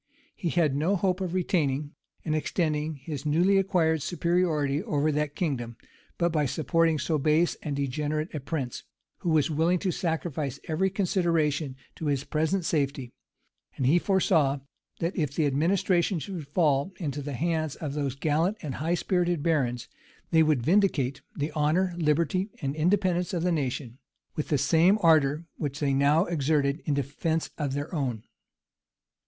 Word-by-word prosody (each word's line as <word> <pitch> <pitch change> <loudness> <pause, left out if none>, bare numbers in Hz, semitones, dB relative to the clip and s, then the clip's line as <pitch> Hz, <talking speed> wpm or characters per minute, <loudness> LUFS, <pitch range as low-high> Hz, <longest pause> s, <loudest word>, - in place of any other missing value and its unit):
He 175 - -2
had 155 -5 +2
no 165 +8 +1
hopes 185 0 0
of 185 -1 -2
retaining 150 -5 0 0.3
and 155 - 0
extending 155 0 -1
his 140 0 -6
newly 175 +6 +3
acquired 170 -5 +2
superiority 165 -4 0
over 155 -7 0
that 150 0 -1
kingdom, 120 -9 -2 0.4
but 170 -1 +1
by 150 -3 +1
supporting 165 +3 +1
so 150 +2 0
base 155 +4 +3
and 145 -3 -3
degenerate 150 +3 -2
a 150 - -3
prince, 135 -3 -4 0.4
who 175 - -2
was 155 -1 +2
willing 165 +4 +2
to 185 +1 -1
sacrifice 160 -6 -2
every 175 +4 +1
consideration 165 -7 0 0.2
to 160 - -4
his 140 -2 0
present 160 +5 0
safety: 140 -6 -1 0.6
and 130 - 0
he 155 +7 +5
foresaw, 160 -8 +2 0.4
that 170 +3 -1
if 150 -5 -1
the 160 - +2
administration 170 +5 +2
should 165 -3 -6
fall 145 +1 +1
into 145 -4 -3
the 145 0 -5
hands 155 +1 -1
of 150 -4 -5
those 140 -3 -2
gallant 160 +8 +1
and 145 -4 -4
high 165 +3 +1
spirited 175 -4 0
barons, 125 -8 0 0.4
they 160 -1 +5
would 155 -6 +2
vindicate 155 - +2
the 150 +1 -2
honor, 160 +5 +1
liberty, 170 +4 +1
and 140 -2 -3
independence 180 +1 +1
of 170 - -1
the 180 - +2
nation, 130 -4 -3 0.4
with 150 - -2
the 150 - +2
same 165 - +4
ardor 155 -1 +4
which 145 -1 -3
they 140 -2 +1
now 145 +5 +3
exerted 150 -2 0
in 145 - +1
defence 145 +4 -2
of 140 -3 -1
their 145 +5 -4
own. 125 -8 -2
155 Hz, 160 wpm, -27 LUFS, 140-175 Hz, 0.6 s, he